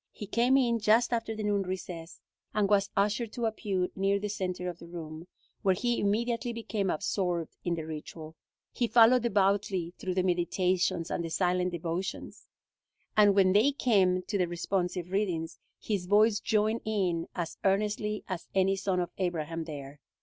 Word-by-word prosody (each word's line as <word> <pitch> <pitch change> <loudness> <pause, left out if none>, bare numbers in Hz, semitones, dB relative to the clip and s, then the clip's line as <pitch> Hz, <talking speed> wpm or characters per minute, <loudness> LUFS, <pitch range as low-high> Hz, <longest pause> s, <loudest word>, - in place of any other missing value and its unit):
He 210 - -8
came 240 +6 +3
in 235 -3 +2
just 225 +3 +3
after 225 -1 -1
the 215 - -4
noon 205 -1 +1
recess, 180 -3 -6 0.3
and 210 -2 +3
was 200 -1 +2
ushered 210 +3 +1
to 240 - -2
a 220 - +1
pew 190 -4 -2
near 195 +1 +2
the 205 +1 -3
center 180 -3 -3
of 175 -1 -5
the 170 - -11
room, 165 -1 -8 0.3
where 190 -1 +3
he 240 +4 0
immediately 235 +4 0
became 220 -4 -2
absorbed 175 0 -1
in 175 -1 0
the 160 -2 -5
ritual. 155 0 -8 0.4
He 240 - 0
followed 240 +2 +6
devoutly 195 -5 +1
through 185 -1 -3
the 185 - +2
meditations 180 -1 0
and 170 - -1
the 165 - -4
silent 180 +1 +1
devotions, 175 +2 -5 0.7
and 205 -2 +6
when 190 -2 +5
they 230 +8 +4
came 190 -9 +2
to 200 +1 -2
the 180 - +2
responsive 180 0 -2
readings, 175 -5 -1 0.2
his 195 -5 -2
voice 210 +2 +4
joined 215 +1 +1
in 185 -6 -1
as 170 -2 -4
earnestly 210 +2 0
as 185 -3 -5
any 195 0 +3
son 190 -2 0
of 175 -1 -2
Abraham 165 -2 -2
there. 145 -2 -8
190 Hz, 170 wpm, -29 LUFS, 175-210 Hz, 0.7 s, followed